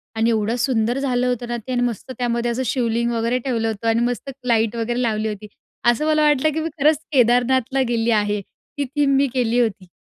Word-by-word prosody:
आणि 225 +1 +2
एवढं 220 +1 0
सुंदर 240 -1 +1
झालं 250 -2 0
होतं 245 -1 -2
ना 240 0 -2
ते 235 +3 -8
आणि 245 -1 0
मस्त 245 +1 -3
त्यामध्ये 240 -1 -1
असं 260 +2 -2
शिवलिंग 235 -1 0
वगैरे 230 +2 0
ठेवलं 230 -3 0
होतं 225 +1 -3
आणि 225 +1 +3
मस्त 245 +3 -3 0.2
लाईट 225 -1 +2
वगैरे 240 +2 -1
लावली 220 -2 0
होती. 210 0 -7 0.4
असं 240 +5 +3
मला 310 0 +2
वाटलं 295 0 +3
की 320 - -1
मी 325 +1 -2
खरंच 305 +1 +5
केदारनाथला 255 +1 +2
गेली 230 0 +1
आहे. 210 -1 +1
ती 285 - -8
थीम 280 -2 +3
मी 275 +1 +3
केली 245 -1 +1
होती. 205 -6 -1
240 Hz, 210 wpm, -21 LUFS, 225-260 Hz, 0.4 s, खरंच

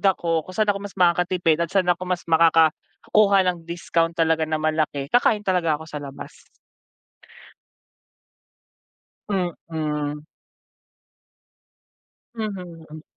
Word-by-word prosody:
ako 170 -4 +1
kung 185 - -9
saan 215 -1 +2
ako 200 - -7
mas 200 -1 -9
makakatipid 175 -2 +2
at 170 - 0
saan 190 +1 +1
ako 180 +1 -7
mas 180 -1 -2
makakakuha 165 +5 +3 0.2
ng 170 -1 -15
discount 170 -1 -1
talaga 160 -1 +1
na 155 - 0
malaki, 155 -2 -1
kakain 215 -4 +3
talaga 175 -5 +1
ako 160 - -11
sa 150 -2 -7
labas. 140 -1 -11 2.8
Mm. 155 -5 -3 2.1
Mhm. 175 -7 -7
165 Hz, 105 wpm, -23 LUFS, 155-185 Hz, 2.8 s, makakakuha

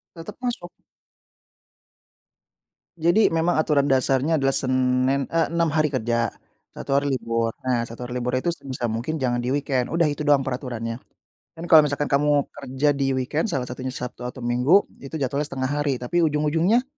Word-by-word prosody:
Tetep 170 +8 -10
masuk. 240 -8 -3 2.3
Jadi 170 +7 +4
memang 165 0 +1
aturan 145 -3 +2
dasarnya 135 +4 +2
adalah 135 0 +2
Senin 130 +1 +1
eh 165 0 +1
6 170 -1 +1
hari 155 -2 +2
kerja, 115 -3 0 0.4
1 135 - -3
hari 140 0 +1
libur. 115 -2 -1 0.2
Nah 120 -2 +1
1 120 +1 -7
hari 120 - -7
libur 125 - -1
itu 175 - -5
sebisa 130 -3 -4
mungkin 120 +8 -3
jangan 120 -2 0
di 125 - -1
weekend, 135 -3 -1
udah 165 -1 +2
itu 150 +1 -3
doang 145 -2 +4
peraturannya. 120 -3 -4 0.6
Dan 165 - -8
kalau 160 - +10
misalkan 145 +1 -2
kamu 145 0 +3
kerja 140 +1 -3
di 135 -1 0
weekend, 135 - -1
salah 135 -9 -1
satunya 125 +1 -6
Sabtu 125 0 -6
atau 125 0 -8
Minggu, 125 +11 +4 0.2
itu 140 +3 -8
jatuhnya 140 +1 -1
setengah 130 0 -3
hari. 145 -3 0
Tapi 125 +8 -1
ujung-ujungnya 160 - +2
135 Hz, 165 wpm, -23 LUFS, 125-155 Hz, 2.3 s, kalau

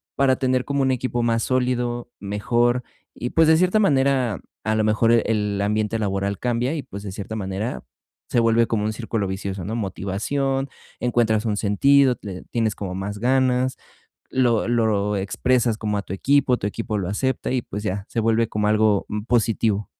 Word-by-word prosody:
para 135 -1 +3
tener 130 -1 0
como 140 -1 0
un 130 - +2
equipo 125 -1 -1
más 115 -1 +1
sólido, 125 -1 -1
mejor, 120 +5 0 0.3
y, 120 - -4
pues, 160 -1 +4
de 160 0 +6
cierta 185 +4 +3
manera, 135 - +2 0.2
a 110 0 0
lo 110 - +1
mejor 110 +2 +3
e 115 -1 +4
el 105 -2 0
ambiente 105 +2 0
laboral 100 -1 -1
cambia 125 +4 -1
y, 145 - -4
pues, 100 - -9
de 100 -2 -6
cierta 100 +3 -6
manera 100 +3 -3 0.5
se - - +2
vuelve 115 0 +4
como 105 -2 -1
un 110 - -1
círculo 110 -2 -2
vicioso, 95 0 -4
¿no? 110 +4 -3
Motivación, 120 +7 -2 0.3
encuentras 115 -2 +1
un 105 - 0
sentido, 130 +6 +4
le 95 -3 -7
tienes 110 -3 0
como 95 -3 -5
más 100 +2 -4
ganas, 130 +1 +2 0.5
lo 120 -4 +1
lo 105 -3 +1
expresas 115 +4 +1
como 105 -2 -2
a 100 - -1
tu 95 - -8
equipo, 135 +4 +2
tu - - -3
equipo 105 0 -3
lo 90 -2 -2
acepta 130 +6 -1
y, 125 -2 0
pues, 105 +1 -6
ya, 100 0 -2
se 115 - -1
vuelve 115 0 +2
como 105 0 -1
algo, 105 -2 +2
mm, 105 0 -3
positivo. 110 -3 +1
115 Hz, 185 wpm, -23 LUFS, 105-125 Hz, 0.5 s, de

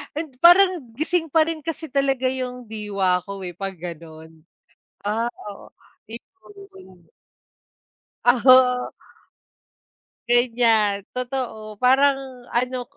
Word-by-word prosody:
Hin 315 +1 -3 0.2
parang 370 +2 +7 0.2
gising 320 +2 -1
pa 320 - +4
rin 325 -2 -5
kasi 325 0 -5
talaga 270 -1 0
'yung 250 -2 -5
diwa 200 -4 -1
ko 200 -1 -7
eh, 175 -1 -6
kapag 195 0 -5
gano'n. 160 -2 -10 0.7
Ah, 225 +3 -1 0.2
oo, - - -14 0.4
iyon. 375 - -15 1.1
Ah, 245 0 +3
oo. 255 -1 +5 1.4
Ganiyan, 230 -4 +2
totoo 240 -5 -5
parang, 270 +2 +4 0.3
ano 250 +1 -1
250 Hz, 100 wpm, -22 LUFS, 205-275 Hz, 1.4 s, parang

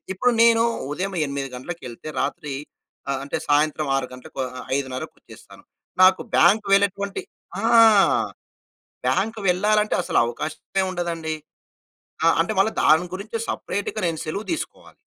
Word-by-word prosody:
ఇప్పుడు 245 +7 +2
నేను 230 -1 +5 0.3
ఉదయం 190 +4 -3
8 140 -1 -4
గంటలకెళ్తే, 130 -1 -8
రాత్రి 145 -2 -3 0.5
ఆహ్, 135 -1 0
అంటె 140 - -3
సాయంత్రం 150 0 +2
6 135 - -1
గంటలకు, 125 +1 -12
ఆహ్, 130 - -12
ఆహ్, - - -11
5:30కి 130 -2 -4
వచ్చేస్తాను. - - -15 0.4
నాకు 185 0 +6
బ్యాంక్ 210 +1 +5
వెళ్లేటువంటి 200 0 0 0.4
ఆ! - - -5 1.4
బ్యాంక్ 220 +3 0
వెళ్లాలంటే 210 +4 +2
అసలవకాశమే 155 +10 -1
ఉండదండి. 170 -3 -3 0.9
ఆహ్, 165 - +5
అంటే 190 +6 -1
మళ్ళా 220 +3 +3
దాని 160 +3 +4
గురించి 215 +4 -5
సెపరేట్‌గా 200 - -3
నేను 160 -1 -3
సెలవు 200 +7 -4
తీసుకోవాలి! 320 - -7
175 Hz, 125 wpm, -23 LUFS, 145-200 Hz, 1.4 s, నాకు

